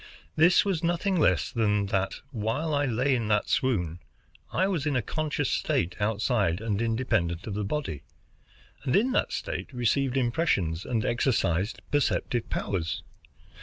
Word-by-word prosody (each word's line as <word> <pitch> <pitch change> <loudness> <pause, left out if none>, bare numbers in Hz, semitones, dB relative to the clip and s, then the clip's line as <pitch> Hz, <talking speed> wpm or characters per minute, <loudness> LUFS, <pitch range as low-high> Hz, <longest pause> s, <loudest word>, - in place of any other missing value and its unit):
This 175 +5 +5
was 185 -5 -1
nothing 175 +2 +1
less 95 - +2
than 105 -3 +1
that, 95 0 0
while 125 +7 -1
I 145 0 +2
lay 130 +3 +1
in 115 -4 0
that 105 -1 +2
swoon, 90 - 0 0.5
I 190 - +2
was 165 -7 -1
in 145 - 0
a 125 - +2
conscious 150 +1 -1
state 85 +1 0
outside 105 -3 +1
and 110 -1 -1
independent 110 -7 0
of 105 - -4
the 105 +1 -2
body, 100 - -3 0.8
and 130 - +1
in 235 +7 +3
that - - +1
state - - -4
received 130 +2 +1
impressions 115 - 0
and 115 -3 -1
exercised 115 -5 0
perceptive 130 -4 0
powers. 85 -5 -2
120 Hz, 150 wpm, -27 LUFS, 100-145 Hz, 0.8 s, This